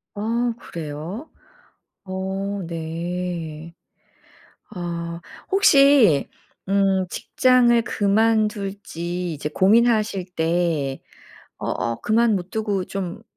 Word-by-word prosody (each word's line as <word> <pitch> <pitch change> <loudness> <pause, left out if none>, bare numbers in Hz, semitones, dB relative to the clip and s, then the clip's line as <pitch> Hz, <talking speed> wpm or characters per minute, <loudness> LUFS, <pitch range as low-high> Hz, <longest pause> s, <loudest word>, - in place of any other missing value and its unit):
아 230 +3 0
그래요? 165 - -7 0.8
어 195 +1 -3
네. 165 0 -5 1.0
아. 170 -3 -5 0.3
혹시 275 - +5 0.4
음 195 -1 +2
직장을 245 -2 +3
그만둘지 200 -5 0
이제 150 0 -4
고민하실 215 0 +3
때 160 -5 0 0.6
어 - - -5
어 115 0 -2
그만 225 +1 +3
못 185 -1 -4
두고 205 -4 -1
좀 195 +2 -5
190 Hz, 145 characters per minute, -22 LUFS, 170-220 Hz, 1.0 s, 혹시